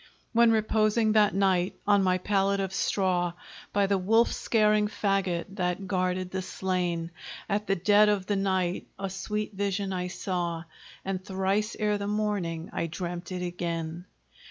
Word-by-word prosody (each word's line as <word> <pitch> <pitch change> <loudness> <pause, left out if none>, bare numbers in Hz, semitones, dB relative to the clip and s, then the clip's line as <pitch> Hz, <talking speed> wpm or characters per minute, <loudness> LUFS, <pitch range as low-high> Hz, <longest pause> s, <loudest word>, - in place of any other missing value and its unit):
When 235 0 +6
reposing 215 0 +2
that 210 -2 +4
night 190 -2 +2
on 205 -1 +4
my 185 -1 +3
pallet 200 +1 +1
of 195 -1 -2
straw, 180 -3 +1 0.4
By 200 0 +2
the 195 0 +1
wolf 225 +5 +3
scaring 215 -2 +2
fagot 195 -5 0
that 180 +1 -1
guarded 185 -1 -1
the 190 - -2
slain, 180 -3 -2 0.4
At 210 0 -1
the 195 - +2
dead 205 +3 +5
of 200 -3 +1
the 205 - 0
night 190 -2 0
a 195 -1 -4
sweet 210 +3 -3
vision 200 0 -1
I 180 -1 -2
saw, 175 -3 -3 0.4
And 190 -1 -3
thrice 195 +3 -1
ere 210 -1 +1
the 200 - -3
morning 200 -6 -2
I 165 - -1
dreamt 175 +2 -5
it 180 -1 -3
again. 170 -1 -4
195 Hz, 155 wpm, -28 LUFS, 180-205 Hz, 0.4 s, When